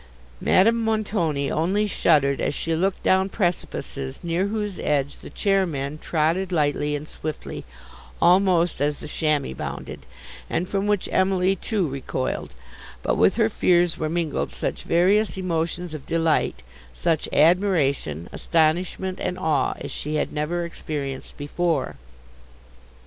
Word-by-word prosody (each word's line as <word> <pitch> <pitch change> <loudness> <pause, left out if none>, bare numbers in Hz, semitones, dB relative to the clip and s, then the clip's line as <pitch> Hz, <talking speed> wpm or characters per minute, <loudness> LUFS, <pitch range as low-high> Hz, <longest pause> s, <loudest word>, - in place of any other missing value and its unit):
Madame 230 +4 +4
Montoni 200 -10 0
only 190 +7 +1
shuddered 145 -8 +2
as - - 0
she 165 0 -1
looked 190 +3 0
down 190 +1 +3
precipices 155 -8 -3
near 175 +3 0
whose 210 -2 -3
edge 140 -1 0
the - - -10
chairmen 160 -8 0
trotted 170 +5 0
lightly 150 -2 +1
and 150 +1 -6
swiftly, 155 0 -6 0.5
almost, 180 -3 +4
as 145 0 +1
the - - -7
chamois 150 - 0
bounded, 65 0 -6 0.4
and 180 - -1
from 195 +1 -1
which 205 -2 +1
Emily 190 0 +2
too 195 -1 -1
recoiled; 130 - -3 0.5
but - - +1
with - - +4
her - - +3
fears 175 -1 +2
were 155 - -1
mingled 165 -2 -1
such - - -2
various 195 +5 +2
emotions 170 -1 -2
of 150 -3 -8
delight, 165 -1 +1 0.3
such 165 -3 0
admiration, 150 - +2
astonishment, 175 +3 0
and 180 - -2
awe, 160 -5 +1
as - - -7
she 150 +1 -4
had 150 - -1
never 165 +3 -1
experienced 145 -5 -5
before. 165 +3 -1
170 Hz, 135 wpm, -24 LUFS, 150-185 Hz, 0.5 s, Madame